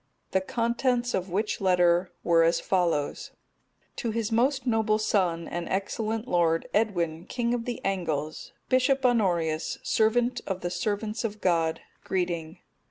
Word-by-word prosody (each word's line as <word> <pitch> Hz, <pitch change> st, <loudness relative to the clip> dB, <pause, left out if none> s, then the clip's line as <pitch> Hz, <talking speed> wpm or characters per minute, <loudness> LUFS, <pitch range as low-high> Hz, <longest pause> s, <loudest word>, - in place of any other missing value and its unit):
The 190 Hz, -, +2 dB
contents 240 Hz, +3 st, 0 dB
of 185 Hz, 0 st, -1 dB
which 205 Hz, +5 st, -1 dB
letter 180 Hz, -1 st, +3 dB
were 170 Hz, -1 st, +4 dB
as 165 Hz, +1 st, +3 dB
follow: 170 Hz, -6 st, +1 dB
"_To 235 Hz, -, -9 dB
his 225 Hz, 0 st, -2 dB
most 260 Hz, +3 st, +2 dB
noble 220 Hz, -3 st, +2 dB
son, 180 Hz, -6 st, 0 dB
and 175 Hz, 0 st, -4 dB
excellent 220 Hz, +4 st, -2 dB
lord, 165 Hz, -3 st, +2 dB
Edwin 175 Hz, -5 st, 0 dB
king 240 Hz, -1 st, -1 dB
of 235 Hz, -1 st, -2 dB
the 245 Hz, -, -3 dB
Angles, 160 Hz, -6 st, -2 dB, 0.2 s
Bishop 260 Hz, +1 st, +2 dB
Honorius, 175 Hz, -10 st, +1 dB
servant 240 Hz, +3 st, +2 dB
of 190 Hz, -2 st, -3 dB
the 175 Hz, -, -3 dB
servants 210 Hz, +3 st, -2 dB
of 215 Hz, -2 st, -3 dB
God, 165 Hz, -4 st, +1 dB, 0.2 s
greeting. 175 Hz, -2 st, -2 dB
195 Hz, 140 wpm, -27 LUFS, 170-230 Hz, 0.2 s, were